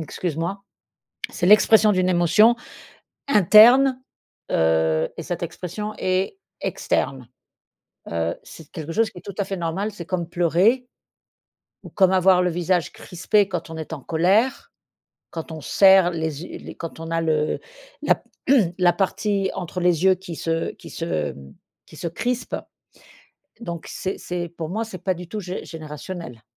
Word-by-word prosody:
Excuse 160 0 -4
moi. 190 +5 -3 0.7
C'est 175 - -3
l'expression 210 +1 +6
d'une 185 0 +1
émotion 185 +7 +4 0.7
interne, 245 +5 +6 0.5
heu 80 0 +2
et 165 - -5
cette 175 0 -4
expression 185 +5 -5
est 185 - -1 0.2
externe, 130 -3 -2 0.8
heu, 85 0 -1
c'est 160 -3 -13
quelque 160 0 -6
chose 225 0 +2
qui - - -16
est - - -16
tout 200 - -6
à 200 - +2
fait 195 -1 -4
normal. 175 +5 -2
C'est 175 -5 -9
comme 175 -2 -3
pleurer 180 +10 +2 1.0
ou - - -11
comme 190 -2 +3
avoir 185 -1 +4
le 180 - +1
visage 175 -1 0
crispé 200 +3 0
quand 175 -3 -4
on 160 - -7
est 160 0 -7
en 145 - -9
colère, 195 - +1 0.6
quand 165 0 -7
on 155 - -7
serre 190 -2 +5
les 160 -2 -3
yeux - - -8
les - - -10
quand 165 -1 -8
on 165 0 -6
a 165 0 0
le 155 -2 0 0.4
la - - +3 0.3
p 220 -11 +3
la 175 -1 +4
partie 195 +1 0
entre 180 +1 -5
les 175 -1 +2
yeux 190 0 +6
qui 180 -3 -8
se 165 0 -2
qui - - -13
se, - - -5
hem, 75 -4 -4 0.3
qui - - -15
se 170 - -3
crispe, 245 +8 -3 1.1
donc 170 -6 -6
c'est 190 - -4
c'est 175 -1 -4
pour 165 -2 -6
moi 220 +5 -2
c'est 185 -5 -10
pas 185 -1 0
du 175 0 -9
tout 215 - -4
gé 180 0 -6
générationnel. 155 - -8
175 Hz, 165 wpm, -23 LUFS, 165-195 Hz, 1.1 s, l'expression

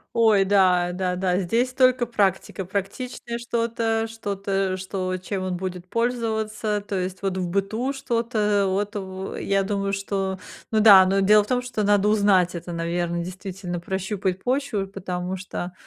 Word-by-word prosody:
Ой, 220 -4 +5
да, 185 -3 +3
да, 180 0 -1
да, 180 0 0
здесь 230 +7 0
только 255 -2 +3
практика, 195 -3 0
практичное 235 +5 -4
что-то 230 -1 -1
что-то, 195 -3 -2
что 185 0 -3
чем 185 +1 -4
он 185 -1 -2
будет 180 0 -5
пользоваться, 220 -2 -1
то 200 - -3
есть 185 +1 -4
вот 190 -1 -1
в 180 -1 -1
быту 215 +8 -1
что-то 230 -5 0
вот 205 +2 -1
в 190 -1 -5
я 195 0 +1
думаю, 195 0 -1
что 195 -1 -2 0.3
ну 220 - +3
да, 200 -3 +9
но 195 +1 +2
дело 210 +2 +5
в - - -12
том, 250 -1 +1
что 245 -4 -3
надо 205 0 +3
узнать 195 -4 +3
это, 170 +1 -6
наверно, 170 +1 -2
действительно, 185 -1 -6
прощупать 190 +1 -2
почву, 250 -7 -1
потому 185 -1 -4
что, 180 -1 -6
195 Hz, 160 wpm, -24 LUFS, 185-220 Hz, 0.3 s, да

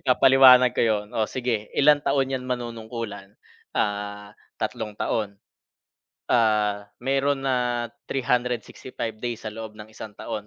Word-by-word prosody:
ipapaliwanag 130 -1 +6
ko - - +1
'yon, 105 -2 +1
o 110 -1 0
sige 120 -5 -2
ilang 145 0 +5
taon 135 -2 +1
'yan 130 - -2
manunungkulan? 115 -4 -5 0.4
Ah, 105 0 -2 0.3
3 105 -2 -4
taon. 100 -3 -2 0.9
Ah, 105 -3 +2
meron 135 +1 +1
na 125 -2 0 0.2
365 125 -2 -2
days 120 -1 -4
sa 110 - -3
loob 110 0 -8
ng 105 0 -10
isang 110 -1 -10
taon, 105 -1 -6
115 Hz, 125 wpm, -24 LUFS, 105-125 Hz, 0.9 s, ipapaliwanag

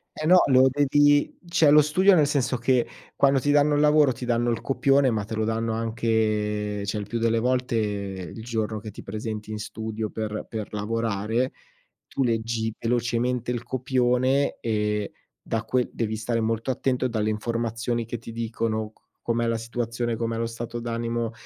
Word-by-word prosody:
Eh 155 - -4
no, 180 +3 +7
lo 130 -1 +6
devi 145 +1 +3
cioè 165 -3 +4
lo 150 +1 +8
studio 185 +7 +4
nel 155 -4 +5
senso 140 -3 0
che 120 +1 +2 0.3
quando 135 -1 +4
ti 145 +2 +1
danno 145 0 +4
il 145 - +2
lavoro, 150 -2 +5
ti 125 - -7
danno 120 0 +1
il 115 - -1
copione, 135 0 +3
ma 110 -2 -1
te 110 - -5
lo 110 0 0
danno 115 0 -1
anche 110 -2 -1
cioè 100 +2 -2
il 105 - -4
più 115 +2 -3
delle 115 0 +2
volte 125 0 0
il 100 -2 -4
giorno 110 -2 -2
che 110 +1 -8
ti - - -10
presenti 110 +1 -5
in 105 - -4
studio 110 0 -4
per 105 0 -4
per 110 -2 -5
lavorare; 110 +3 -1 0.6
tu 135 - -1
leggi 115 -1 -1
velocemente 120 +1 0
il 120 -2 -2
copione 130 +1 +1
e 105 -2 -1 0.3
da 115 0 -3
que 125 +2 0
devi 110 -2 -2
stare 115 +2 -1
molto 115 +3 -1
attento 130 0 0
dalle 110 -3 -1
informazioni 115 +1 -2
che 120 +2 -5
ti 115 +1 -10
dicono 110 -1 -2
c - - -34 0.2
com'è 115 0 +1
la 115 0 0
situazione, 115 +1 -3
com'è 115 0 -2
lo 115 - -1
stato 115 +1 -5
d'animo, 115 0 -2
115 Hz, 180 wpm, -25 LUFS, 110-125 Hz, 0.6 s, lo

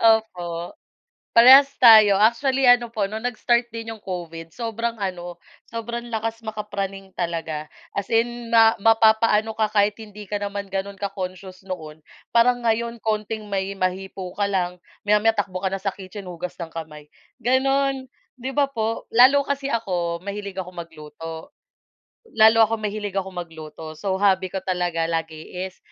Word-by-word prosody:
Opo. 175 - -6 0.6
Parehas 265 +4 +9
tayo, 215 -5 +8
actually 260 +6 +2
ano 245 -1 +5
po 220 -3 -2
no'ng 220 +4 -3
nag-start 240 0 +1
din 225 -1 -6
'yong 220 - -11
COVID 165 -4 -7
sobrang 230 0 -3
ano, 180 -4 -5 0.3
sobrang 235 +1 -5
lakas 225 0 -3
maka-praning 200 -3 -5
talaga, 165 -3 -4 0.2
as 200 - -4
in 235 +1 0
ma 225 -1 +6
mapapa-ano 220 0 +4
ka 220 -1 0
kahit 210 0 +2
hindi 210 -1 -10
ka 205 +1 -4
naman 200 -1 -5
gano'n 195 +1 -3
ka-conscious 185 -1 -6
noon, 160 -4 -7 0.3
parang 245 +1 +3
ngayon 235 +1 0
konting 215 -1 -3
may 195 0 -2
mahipo 185 0 -3
ka 200 +1 -1
lang, 180 -2 -2 0.2
maya-maya 210 +2 +3
takbo 190 -3 -2
ka 190 - 0
na 195 - -3
sa 195 0 -3
kitchen, 195 +1 -10
hugas 180 0 -7
ng 165 -2 -7
kamay 155 -2 -8 0.4
gano'n, 270 +1 +1 0.3
'di 260 +2 -3
ba 290 - +4
po? 225 -2 -2
Lalo 265 +4 +6
kasi 280 -1 -2
ako, 180 -8 -2
mahilig 200 -1 -6
akong 180 -2 -6
magluto. 160 0 -9 0.8
Lalo 220 +1 +6
akong 225 0 -3
mahilig 205 -1 -3
akong 190 -1 -3
magluto, 160 -2 -8
so 190 +4 -2
hobby 190 -2 +2
ko - - -3
talaga 175 -3 -1
lagi 160 -1 -4 0.2
is 185 - -26
205 Hz, 155 wpm, -23 LUFS, 180-225 Hz, 0.8 s, Parehas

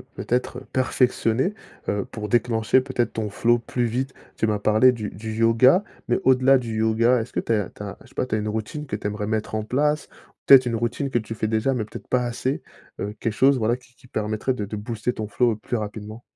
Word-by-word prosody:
peut-être 125 +1 -2
perfectionner, 130 - +1 0.4
heu, 100 -1 -1
pour 105 -1 -6
déclencher 120 0 +3
peut-être 130 -2 -1
ton 110 -1 -3
flow 120 +4 +2
plus 120 +1 -2
vite. 130 +3 -2 0.2
Tu 110 - +1
m'as 105 -1 0
parlé 110 +5 +5
du 110 -4 -4
du 110 +2 -7
yoga, 115 - +5 0.2
mais - - +2
au-delà 130 +1 +5
du 115 -3 -4
yoga, 115 +3 +3
est-ce 110 - -6
que - - 0
tu - - -4
as 105 -5 +1
tu 105 - -9
as, 100 - -7
je - - -17
sais - - -22
pas, - - 0
tu 110 - -2
as - - +1
une 105 0 -2
routine 110 +8 -4
que - - -3
tu - - -9
aimerais 105 0 -2
mettre 110 0 -2
en 110 0 -1
place? 150 +5 +1 0.4
Peut-être 135 -2 +8
une 120 -1 -1
routine 120 +4 -1
que 120 - +1
tu 110 +1 -6
fais 110 - -1
déjà, 110 +5 +1
mais 115 -4 -1
peut-être 105 - -10
pas 125 -1 +2
assez. 125 +3 -2 0.4
Heu, 105 - -3
quelque 115 - -1
chose, 135 +4 +4
voilà, 115 +1 +1
qui 125 0 -17
qui 130 - -19
permettrait 110 +4 -1
de 125 - -4
de 105 +1 -5
booster 115 +2 -2
ton 110 -3 -5
flow 115 +1 +1
plus 115 - -4
rapidement? 110 +1 -5
115 Hz, 235 wpm, -24 LUFS, 110-125 Hz, 0.4 s, Peut-être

